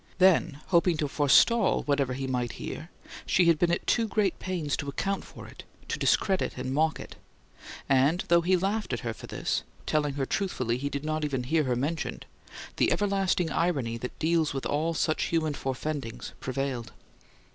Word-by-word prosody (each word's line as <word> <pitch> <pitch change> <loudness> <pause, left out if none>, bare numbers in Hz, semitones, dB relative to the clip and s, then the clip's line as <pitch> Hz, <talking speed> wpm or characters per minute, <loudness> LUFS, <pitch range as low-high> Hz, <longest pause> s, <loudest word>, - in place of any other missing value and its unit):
Then, 180 -6 +4
hoping 170 -1 +3
to 150 - 0
forestall 170 - +4
whatever 140 -3 +1
he 135 +1 -3
might 125 -3 -2
hear, - - -7 0.4
she 180 - +4
had 165 -2 +4
been 175 - +3
at 175 - -1
too 230 -2 +2
great 205 -4 0
pains 170 -6 -2
to 145 - -4
account 195 +8 -2
for - - -11
it, - - -12 0.3
to - - -2
discredit 190 -8 +1
and 130 +1 -3
mock 155 -1 +1
it; - - -10 0.7
and, 140 +7 +3
though 170 0 +5
he 185 +2 +3
laughed 200 -2 -1
at 120 - -2
her 115 -1 -3
for - - -11
this, - - -1 0.2
telling 150 -2 0
her 135 -2 -1
truthfully 130 - -1
he 140 +2 -2
did 140 +1 -4
not 155 0 -1
even 135 -4 -1
hear 155 +4 +1
her 125 -1 +1
mentioned, 150 +5 -3 0.5
the - - +3
everlasting 195 -4 +1
irony 140 -10 0
that 125 +2 -6
deals 160 -2 +1
with 135 - -3
all 160 +3 0
such 155 -1 +1
human 160 -2 0
forefendings 135 -2 -4
prevailed. 130 -3 -3
150 Hz, 180 wpm, -28 LUFS, 135-175 Hz, 0.7 s, though